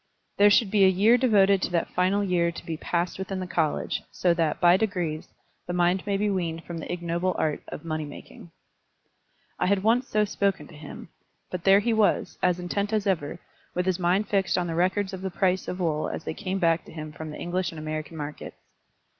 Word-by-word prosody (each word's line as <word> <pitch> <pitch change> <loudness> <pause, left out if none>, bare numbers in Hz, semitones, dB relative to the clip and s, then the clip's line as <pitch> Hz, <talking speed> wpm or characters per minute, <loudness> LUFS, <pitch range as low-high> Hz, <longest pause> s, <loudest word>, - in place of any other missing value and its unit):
"There 205 +1 +7
should 205 -1 +3
be 205 -2 +4
a - - +8
year 200 +6 +5
devoted 200 -6 +4
to - - -1
that 170 - 0
final 190 +3 +2
year 175 -3 +1
to 165 - -10
be 165 - -3
passed 170 +3 -2
within 190 0 -4
the 185 - -3
college, 160 -4 -1
so 175 -2 +1
that, 165 -2 0
by 175 0 +6
degrees, 180 -7 -2 0.4
the 175 - -3
mind 180 +2 +1
may 200 -1 +1
be 210 +1 0
weaned 170 -4 -2
from 170 -1 -6
the - - -6
ignoble 175 +1 -1
art 155 -2 -1
of 150 - -8
money 155 -1 -2
making." 145 +3 -12 1.1
I - - +1
had 195 0 +2
once 240 +4 +3
so 210 0 +2
spoken 200 -1 -1
to 165 - -13
him; 150 - -10 0.4
but 180 -2 -5
there 195 +1 +6
he 235 +2 +1
was, 220 -2 +1
as 180 -1 +2
intent 200 +4 -2
as 215 -2 0
ever, 165 -7 -1 0.4
with 180 0 0
his 185 -1 0
mind 185 +4 +1
fixed 195 -2 +1
on 180 - 0
the 165 - -3
records 185 +3 0
of 185 - -6
the 190 - -2
price 185 0 0
of 180 - -4
wool 155 -4 0
as - - -5
they - - -4
came 190 +4 -3
back 165 -2 +2
to - - -13
him 155 -1 -7
from 155 +1 -8
the 150 - -7
English 180 0 -2
and 165 - -10
American 155 +1 -5
markets. 150 0 -7
180 Hz, 220 wpm, -26 LUFS, 165-195 Hz, 1.1 s, a